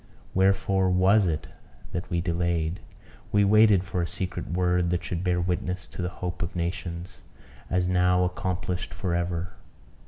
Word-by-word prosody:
Wherefore 95 0 +3
was 95 +2 +4
it 80 -2 -1 0.5
that 90 -2 -4
we 85 -2 0
delayed? 85 -1 -1 0.5
We 105 0 +4
waited 105 -2 +6
for 90 -1 -2
a 85 - -1
secret 90 +1 -3
word, 90 0 +1
that 90 0 0
should 85 0 -3
bear 90 -1 +1
witness 90 0 -2
to 80 - -8
the 90 - -1
hope 90 -1 -5
of 85 0 -3
nations, 85 +1 -4 0.5
as 90 0 +1
now 90 0 +3
accomplished 90 0 -2
for 90 -2 -2
ever. 85 +1 -2
90 Hz, 155 wpm, -26 LUFS, 85-95 Hz, 0.5 s, waited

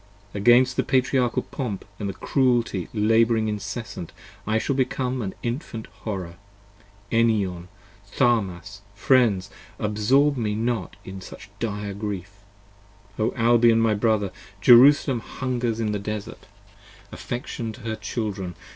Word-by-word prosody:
Against 120 +5 +4
the - - +2
Patriarchal 130 -2 +1
pomp 115 -9 -5
and 100 -2 -4
cruelty 120 - +1
labouring 110 +1 +3
incessant 105 -3 -5 0.3
5 110 - 0
I - - +4
shall 135 +4 -1
become 130 -1 -1
an 95 -3 -4
Infant 120 -2 -4 0.2
horror. 95 -6 -5 0.8
Enion! 100 -7 +1 0.4
Tharmas! 100 -5 0
friends! 100 -5 +2 0.3
Absorb 125 +7 +2
me 105 -3 -1
not 115 -3 -2
in 95 0 -8
such 100 +2 -11
dire 105 -2 -3
grief: 100 -1 -5 0.8
O 110 +3 +1
Albion, 115 -1 +4
my 115 -1 +3
brother! 105 -2 +1 0.3
Jerusalem 130 +3 +6
hungers 120 -1 -3
in 110 -2 0
the 105 - -2
desart; 105 0 -6 0.6
affection 120 -1 -5
to 120 - -13
her 110 -1 -3
children! 100 -4 -4
110 Hz, 120 wpm, -24 LUFS, 100-120 Hz, 0.8 s, Jerusalem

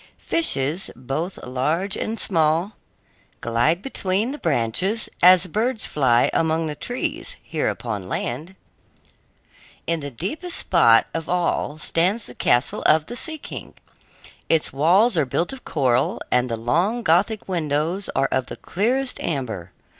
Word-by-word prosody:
Fishes, 165 - +1
both 135 +9 -4
large 155 +10 0
and 225 0 -3
small, 165 +3 +1 0.6
glide 120 - +1
between 205 -2 -1
the 295 - -7
branches 170 - 0
as 185 +1 +7
birds 220 +6 -1
fly 125 -5 +2
among 160 0 +1
the 155 - -3
trees 250 - -4
here - - -1
upon 105 -6 -5
land. 155 +10 -4 1.3
In 165 -1 0
the 145 -1 -5
deepest 260 - -3
spot 115 -11 +5
of 165 -1 -4
all 175 -4 0
stands 180 +8 +1
the 125 - -7
castle 120 +1 +2
of 155 0 +4
the 240 - -7
Sea 315 +5 -2
King. - - -9 0.7
Its 160 -4 +3
walls 180 - +4
are 155 - +3
built 170 - -1
of 265 - -11
coral, 130 -3 +1
and 125 0 +2
the 115 - -2
long 175 - 0
Gothic 200 +5 +2
windows 165 +2 -1
are 135 +1 +2
of 130 -1 0
the - - -6
clearest 250 +7 -1
amber. 110 - -3
165 Hz, 140 wpm, -22 LUFS, 135-200 Hz, 1.3 s, as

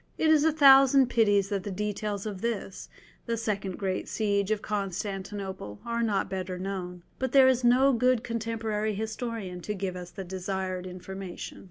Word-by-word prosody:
It 315 - +3
is 305 -2 +5
a 320 - +4
thousand 270 -3 +6
pities 205 -4 +3
that 200 -2 -1
the 205 - -6
details 205 +1 -3
of 200 -3 -5
this, 230 -4 -4 0.4
the 230 0 -1
second 200 -4 -2
great 190 -2 -2
siege 200 -2 0
of 215 -1 -1
Constantinople, 195 - -4
are 235 0 -1
not 210 -4 +1
better 185 -1 -4
known. 180 -2 -5 0.2
But 260 -1 -2
there 270 -2 +7
is 255 -1 +3
no 260 +3 +5
good 250 0 +2
contemporary 220 -2 -2
historian 220 -4 -4
to 210 +4 -4
give 190 -1 -3
us 180 -1 -7
the 195 +1 -7
desired 185 0 -4
information. 185 0 -7
205 Hz, 170 wpm, -28 LUFS, 190-230 Hz, 0.4 s, there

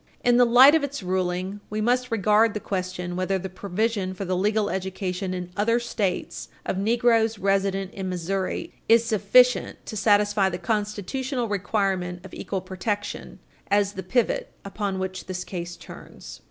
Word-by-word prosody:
In 245 0 +4
the 245 -1 +6
light 255 +5 +8
of 320 -2 +3
its 285 -6 -4
ruling, 185 +1 -2
we 215 - -3
must 250 +3 +1
regard 215 0 +3
the - - -1
question 185 -3 -4
whether 185 +1 0
the 190 +1 -5
provision 200 0 -2
for 195 - -5
the 185 0 -1
legal 205 +2 +1
education 190 0 -3
in 180 -1 -5
other 230 +4 +2
States 205 -6 -3 0.2
of 190 - -2
negroes 225 +1 +2
resident 195 -1 0
in 190 -1 -4
Missouri 185 +2 -3 0.2
is 230 0 +6
sufficient 235 +3 +3
to - - -6
satisfy 205 -1 +3
the 175 - -4
constitutional 225 +5 -2
requirement 195 -3 -1
of 190 - -11
equal 190 -2 -4
protection 190 +3 -4 0.3
as 200 0 +2
the 190 - -5
pivot 220 +6 0
upon 200 -1 -3
which 185 0 -4
this 185 -1 -4
case 175 -1 -6
turns. - - -12
200 Hz, 160 wpm, -25 LUFS, 185-220 Hz, 0.3 s, light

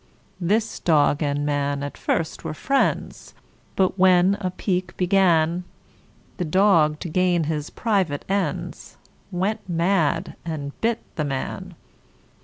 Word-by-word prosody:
This 215 +5 0
dog 150 -2 +3
and 145 -1 0
man 145 -1 -1
at 145 - -5
first 160 -1 -2
were 160 -2 -4
friends; 275 - -1 0.4
But 190 0 +1
when 185 +1 +5
a 185 - -1
pique 180 0 -3
began, 180 -2 +3 0.7
The 180 - -2
dog, 165 -3 +3
to - - -4
gain 175 0 +2
his 150 -1 -3
private 190 - -1
ends, 195 0 -3 0.3
Went 195 +5 -1
mad, 170 -2 +1
and 150 -4 -4
bit 230 0 0 0.2
the 150 - 0
man. 135 -2 -4
175 Hz, 125 wpm, -23 LUFS, 150-190 Hz, 0.7 s, when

